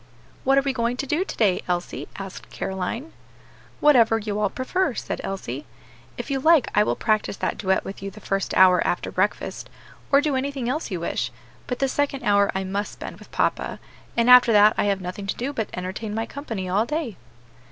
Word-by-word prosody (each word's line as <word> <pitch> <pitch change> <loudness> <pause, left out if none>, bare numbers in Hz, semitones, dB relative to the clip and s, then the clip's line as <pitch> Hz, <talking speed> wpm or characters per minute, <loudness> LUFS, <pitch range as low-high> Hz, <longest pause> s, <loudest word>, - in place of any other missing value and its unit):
"What 270 +1 +4
are 275 - +4
we 275 -1 0
going 235 0 -1
to 275 - -2
do 300 +7 +1
to - - -8
day, 200 -5 +3
Elsie?" 175 -1 -3
asked 195 -1 -8
Caroline. 230 - -4 0.7
"Whatever 235 -7 +5
you 210 -1 -3
all 210 -2 +2
prefer," 270 - -1
said - - -4
Elsie. 145 -8 -5 0.5
"If - - -5
you 270 - +1
like 315 -1 +5
I 210 - +5
will 210 - +1
practice 215 -2 0
that - - -1
duet 190 -1 0
with 195 - -7
you 195 - -4
the 205 +2 -12
first 195 -1 -2
hour 185 -2 +6
after 175 - -1
breakfast, 195 +3 -1 0.4
or 280 - +7
do 290 -1 0
anything 265 -2 -2
else 300 +6 -2
you 185 -4 -3
wish; 120 -7 -2 0.4
but 250 - -2
the 270 - +1
second 275 0 -1
hour 200 -1 +4
I 190 - 0
must 200 +2 -3
spend - - -8
with - - -15
papa, - - -1 0.4
and 235 0 +3
after 250 -1 +8
that 210 0 +7
I - - +1
have 200 -1 +1
nothing 185 +2 -6
to - - -1
do 270 +4 -3
but 220 -6 -2
entertain 190 +4 -5
my 225 +1 -1
company 225 -10 -5
all 205 +5 +1
day." 300 - -2
215 Hz, 205 wpm, -24 LUFS, 195-270 Hz, 0.7 s, after